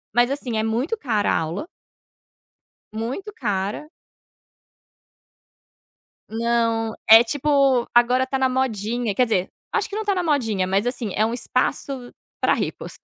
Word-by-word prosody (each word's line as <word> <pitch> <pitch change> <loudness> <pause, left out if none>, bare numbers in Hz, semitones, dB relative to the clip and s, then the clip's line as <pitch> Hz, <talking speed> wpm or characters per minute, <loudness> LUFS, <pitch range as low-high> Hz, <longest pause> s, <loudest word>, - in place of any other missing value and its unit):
mas, 240 +2 +4
assim, 250 -5 -3
é 220 - +1
muito 245 - -1
cara 220 - 0
a - - +2
aula 165 - -3 1.3
muito 245 - -5
cara. 205 - -3 2.4
Não, 230 0 0
é 225 +1 +10
tipo, 275 -1 +2
agora 250 +2 +4
tá 270 0 -2
na 265 0 +2
modinha 240 -3 -1
quer 250 - +3
dizer, 190 -4 0 0.2
acho 430 - 0
que 415 - -6
não 435 - -2
tá 405 -1 +1
na 365 - 0
modinha, 230 - 0
mas, 195 +4 0
assim, 245 -5 -3
é 215 - +2
um 225 +2 -1
espaço 255 +1 -2 0.3
pra - - +3
ricos. - - -5
240 Hz, 145 wpm, -22 LUFS, 220-270 Hz, 2.4 s, é